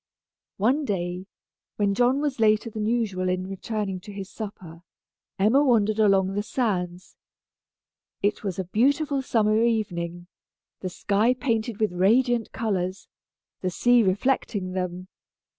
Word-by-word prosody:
One 255 +9 +2
day, 180 -5 -3 0.5
when 205 -1 +1
John 250 +6 +2
was 285 -4 -2
later 215 +1 +3
than 215 0 -3
usual 205 -6 0
in 185 0 -1
returning 195 0 -4
to 205 - -11
his 195 -1 -7
supper, 185 -6 -8 0.6
Emma 225 +9 +4
wandered 220 -5 +2
along 195 -2 +3
the 205 - 0
sands. 185 -6 -3 1.1
It 205 +2 0
was 195 -4 -3
a 190 - -1
beautiful 275 - +1
summer 220 -4 +2
evening, 175 -7 -1 0.5
the 185 - -4
sky 210 +7 +1
painted 230 -3 -1
with 215 -3 +1
radiant 230 +5 +2
colors, 190 -4 -2 0.5
the 185 - 0
sea 245 +6 +4
reflecting 200 -1 0
them. 185 0 -4
210 Hz, 130 wpm, -25 LUFS, 185-235 Hz, 1.1 s, Emma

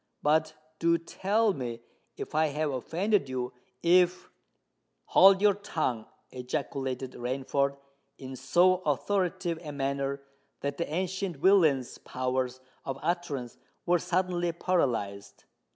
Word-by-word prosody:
"But 155 +1 +2 0.2
do 170 0 +3
tell 200 +5 +1
me—if 120 -1 -8
I 155 +1 +3
have 150 0 -1
offended 170 - 0
you—if——" 130 +8 0 0.7
"Hold 195 +1 +6
your 205 -1 +6
tongue!" 155 - -2 0.2
ejaculated 130 0 -3
Rainford, 135 +2 -1 0.4
in 130 -1 -8
so 180 +7 +4
authoritative 180 +1 -1
a 150 - -6
manner 140 0 -2 0.4
that 140 0 -3
the 170 - -2
ancient 185 0 -2
villain's 155 -7 +3
powers 130 0 -2 0.2
of 135 0 -4
utterance 150 -9 -2 0.3
were 175 0 +3
suddenly 175 0 0
paralysed. 115 - -1
155 Hz, 105 wpm, -29 LUFS, 130-180 Hz, 0.7 s, Hold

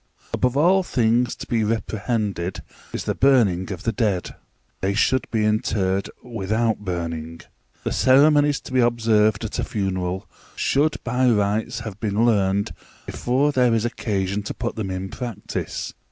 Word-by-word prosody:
Above 125 +1 +1
all 180 +6 +5
things 120 -6 +1
to - - -8
be 115 -2 0
reprehended 105 -3 -2 0.3
is - - -4
the - - -1
burning 105 -9 +3
of 95 0 -6
the 115 - +1
dead: 105 -7 -1 0.5
they 100 +1 -1
should 130 +4 +2
be 110 -2 +1
interred 100 -3 0
without 110 0 -1
burning. 85 -4 -4 0.4
The - - -2
ceremonies 145 +2 +4
to - - -11
be 130 - +3
observed 110 -3 +3
at 110 - -4
a - - 0
funeral 95 -2 -2 0.3
should 150 +3 +2
by 125 +1 +2
rights 110 +2 0
have 110 -3 -7
been 105 +1 +1
learned 100 -3 +2 0.3
before 135 +4 +1
there 125 -4 +3
is 115 0 0
occasion 100 -4 -1
to 105 - -6
put 120 0 -3
them 105 -4 -3
in 95 +1 -4
practice. 120 -2 -5
110 Hz, 155 wpm, -23 LUFS, 95-120 Hz, 0.5 s, all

